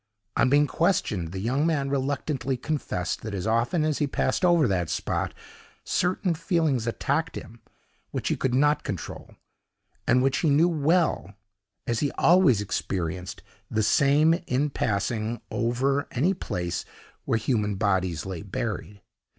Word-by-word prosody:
On 125 - +3
being 145 +2 +5
questioned, 110 - 0
the 95 - -5
young 125 +9 0
man 140 -4 0
reluctantly 135 -1 -1
confessed, 125 - -3
that 110 -2 -5
as 95 - -3
often 120 +9 +1
as 155 -2 0
he 145 - +1
passed 140 - -1
over 170 -6 +5
that 90 -4 0
spot, - - -1 0.5
certain 180 0 0
feelings 160 - 0
attacked 115 - -1
him, 115 +3 -9 0.5
which - - -3
he - - +1
could 125 -1 -1
not 145 +3 +3
control, 90 -8 -6 0.7
and 125 +1 +4
which 135 +1 +2
he 160 - +2
knew 150 +4 +5
well, 160 - +1 0.5
as 115 -1 0
he 145 - +1
always 165 - +4
experienced 90 -2 -3 0.3
the 110 0 0
same, 145 +7 +4
in 140 +4 0
passing 110 +1 -1
over 130 +4 0
any 155 +10 +1
place 90 - -3 0.4
where - - +1
human 105 -3 0
bodies 95 -4 0
lay 95 -3 -5
buried. 100 0 -5
125 Hz, 145 wpm, -26 LUFS, 105-150 Hz, 0.7 s, being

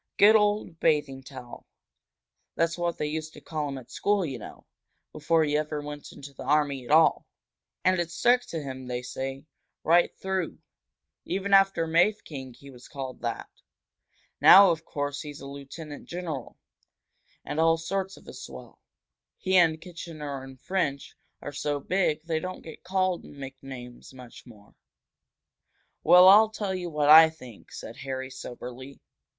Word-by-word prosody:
"Good 210 +2 +7
old 210 -5 +1
Bathing 145 -3 +1
Towel! 130 -3 -11 0.9
That's 165 0 +1
what 175 -1 -2
they - - -2
used 155 +1 -4
to - - -12
call 150 -2 -4
him 135 - -5
at 125 -2 -12
school, 205 -2 +1
you 135 -5 -5
know, - - -11 0.5
before 165 -1 +1
he 150 -1 0
ever 150 0 -1
went 145 0 -8
into 140 0 -11
the - - -12
army 145 -1 +1
at 120 - -13
all. 160 +1 +4 0.6
And 185 -1 +3
it 170 -1 -1
stuck 245 +8 +3
to 160 -3 -5
him, 130 -2 -7
they 125 0 -4
say, 135 +2 -6 0.4
right 170 +2 +4
through. 190 -3 -3 0.7
Even 195 +2 -2
after 195 -3 +5
Mafeking 160 - 0
he 140 +2 -14
was 125 -1 -14
called 135 -3 -7
that. 120 -1 -4 0.9
Now, 195 0 +9
of 160 -1 -3
course, 145 0 -4
he's 145 -1 -8
a - - -10
lieutenant 140 +2 -9
general, 165 -7 -6 0.9
and 150 - -4
all 165 0 +4
sorts 190 +3 -3
of - - -18
a - - -9
swell. - - -11 0.6
He 190 0 -1
and 165 -3 +4
Kitchener 155 -5 -7
and 135 -1 -12
French 145 -7 -2 0.3
are 145 - -6
so 145 0 -2
big 155 -1 0
they 160 -1 -1
don't 185 +3 -7
get 160 - -11
called 185 -1 0
nicknames 135 -2 -10
much 125 0 -13
more." 105 -4 -17 1.3
"Well, 180 +3 +8
I'll 210 +3 +8
tell 205 -3 -3
you 180 -2 -4
what 150 -2 0
I 160 +1 +10
think," 130 -9 -14
said 115 - -9
Harry, 130 0 -5
soberly. 130 +1 -9
150 Hz, 160 wpm, -27 LUFS, 135-175 Hz, 1.3 s, I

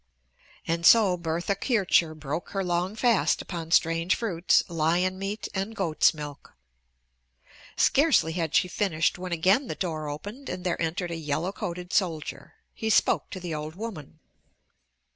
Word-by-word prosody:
And 165 0 -1
so 200 -1 +6
Bertha 170 +2 -2
Kircher 195 -7 +1
broke 155 +2 -5
her 195 -1 -1
long 180 +3 -1
fast 230 -2 +2
upon 165 -3 -6
strange 165 +1 +3
fruits, 180 -7 +2
lion 175 +3 0
meat, 200 +2 -4
and 195 +3 -3
goat's 170 -7 +3
milk. 150 -2 -9 1.2
Scarcely 280 - +4
had 165 -2 -2
she - - +4
finished 175 -2 0
when 180 0 -6
again 190 - +2
the - - -4
door 155 -4 -3
opened 205 - -7
and 180 - -5
there 175 -2 -1
entered 170 +2 -2
a - - -3
yellow 160 +3 -2
coated 180 -2 -6
soldier. 155 -7 -2 0.2
He 220 - -3
spoke - - +2
to 185 - -6
the 175 -2 -5
old 155 +1 -5
woman. 185 -8 -7
175 Hz, 150 wpm, -27 LUFS, 160-195 Hz, 1.2 s, so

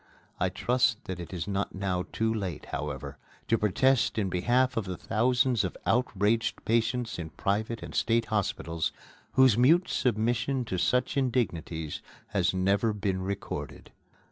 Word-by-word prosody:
I 95 - +2
trust 120 +4 +1
that 95 -2 -5
it 85 -2 -7
is 90 -1 -4
not 100 0 -2
now 95 -2 -1
too 110 0 0
late, 95 -8 -4
however, 70 -1 -4 0.3
to 115 - +3
protest 115 +5 +2
in 100 -3 +1
behalf 125 +8 +2
of 115 - -1
the 90 -2 -4
thousands 120 +2 +2
of 95 - -4
outraged 115 -2 +1
patients 115 -1 0
in 80 -2 -5
private 105 +7 -2
and - - -8
state 115 0 +2
hospitals 85 -5 -1 0.4
whose 130 -4 +5
mute 165 +9 +5
submission 120 +3 0
to 95 -5 -2
such 125 +6 +1
indignities 85 - -1 0.3
has 100 -4 +2
never 100 +4 +1
been 95 -2 -1
recorded. 100 +1 -5
105 Hz, 145 wpm, -28 LUFS, 95-120 Hz, 0.4 s, whose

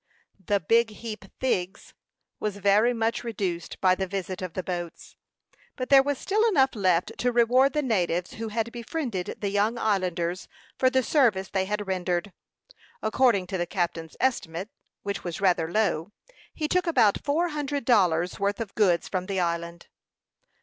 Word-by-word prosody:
The 200 +3 +1
"big 230 +7 +3
heap 215 -1 -8
thigs" 190 -7 -2 0.5
was 210 -1 -3
very 205 +4 +4
much 230 0 -1
reduced 195 -7 -4
by 185 -1 +4
the 190 +1 -2
visit 185 -1 -4
of 180 -3 -5
the 185 - -3
boats; 175 -2 -6 0.6
but 255 -1 -4
there 275 -1 +8
was 285 0 -1
still 420 +9 0
enough 270 -9 +3
left 185 -6 +1
to 245 - +1
reward 245 +3 +4
the 300 -1 0
natives 180 -7 0
who 225 0 -5
had 225 +1 -2
befriended 235 - -4
the 200 - 0
young 210 +4 +1
islanders 185 -5 -1 0.3
for 260 - +3
the 260 0 +2
service 225 -10 +2
they 190 -1 0
had 210 +1 -2
rendered. 180 0 -1 0.7
According 215 -3 +3
to 190 0 -4
the 175 - -1
captain's 170 -4 -3
estimate, 195 -7 -1 0.3
which 200 0 -4
was 175 -3 -5
rather 175 -4 +2
low, 190 -4 0 0.4
he 305 - -3
took 360 +3 +1
about 220 -11 +3
four 325 +5 +1
hundred 290 -3 -3
dollars' 180 -7 +2
worth 200 0 0
of 220 -4 -5
goods 185 -6 +2
from 185 -1 -3
the 195 -2 -1
island. 170 0 -2
205 Hz, 165 wpm, -26 LUFS, 180-240 Hz, 0.7 s, there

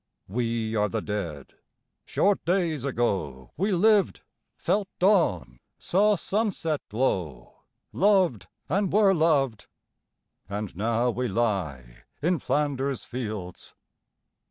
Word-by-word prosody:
We 115 +1 -2
are 105 -1 +2
the 110 0 -3
Dead. 85 -10 -5 0.5
Short 200 0 +1
days 170 -6 0
ago 95 - -2
We 195 +6 0
lived, 205 +2 +3 0.4
felt 205 -2 0
dawn, 90 - +2 0.2
saw 210 +3 +2
sunset 190 -6 -1
glow, 95 - -2 0.4
Loved, 180 - +2 0.2
and 195 +4 0
were 205 -1 +5
loved, 145 - +1 0.8
and 100 -2 -4
now 115 +5 +1
we 125 +1 -2
lie 85 - -2
In 170 +2 +1
Flanders 140 -1 -1
fields. 105 -8 -6
125 Hz, 105 wpm, -26 LUFS, -, 0.8 s, were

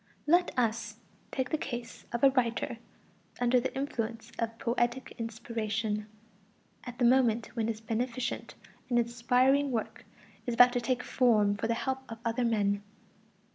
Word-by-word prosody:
Let 350 +3 +4
us 225 -2 0 0.4
take 260 -1 -2
the 310 - +1
case 240 -3 -6
of 235 +1 -3
a 275 - +8
writer 235 -2 0 0.6
under 245 +1 +4
the 260 - -2
influence 230 -4 -3
of 230 0 -2
poetic 240 +2 -1
inspiration, 220 -2 -2 0.8
at 245 -1 -7
the 245 - +2
moment 235 -3 +3
when 225 -2 0
his 220 -1 -3
beneficent 235 +2 -3 0.3
and 240 - +2
inspiring 250 +4 +3
work 230 -4 -3 0.4
is 240 - 0
about 245 0 +7
to 245 - 0
take 250 0 0
form 215 -5 +3
for 205 +2 -2
the 230 - +1
help 265 +2 -2
of 225 - -6
other 230 +2 0
men. 205 -3 +1
235 Hz, 150 wpm, -30 LUFS, 225-250 Hz, 0.8 s, a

